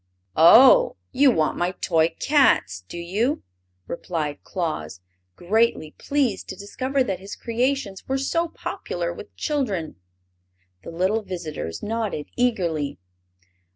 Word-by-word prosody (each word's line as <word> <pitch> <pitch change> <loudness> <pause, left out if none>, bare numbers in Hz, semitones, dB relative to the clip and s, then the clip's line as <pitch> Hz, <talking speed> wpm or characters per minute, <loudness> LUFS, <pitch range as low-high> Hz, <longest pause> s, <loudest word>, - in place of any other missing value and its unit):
"Oh, 260 - +7
you 270 +2 +5
want 160 -10 +1
my 175 +1 0
toy 165 -1 +2
cats, 185 - +3
do 175 - -8
you?" 205 - -1 0.4
returned 155 - -4
Claus, 155 - -4 0.4
greatly 210 -4 +1
pleased 270 -9 -1
to - - -5
discover 260 +8 -1
that 195 -6 -3
his 195 +2 -8
creations 235 -4 -2
were 270 - 0
so 335 +5 0
popular - - -4
with - - -11
children. 210 - -2 0.8
The - - -9
little 185 +6 0
visitors 160 - -6
nodded 215 -8 -3
eagerly. 175 - 0
195 Hz, 120 wpm, -23 LUFS, 165-260 Hz, 0.8 s, Oh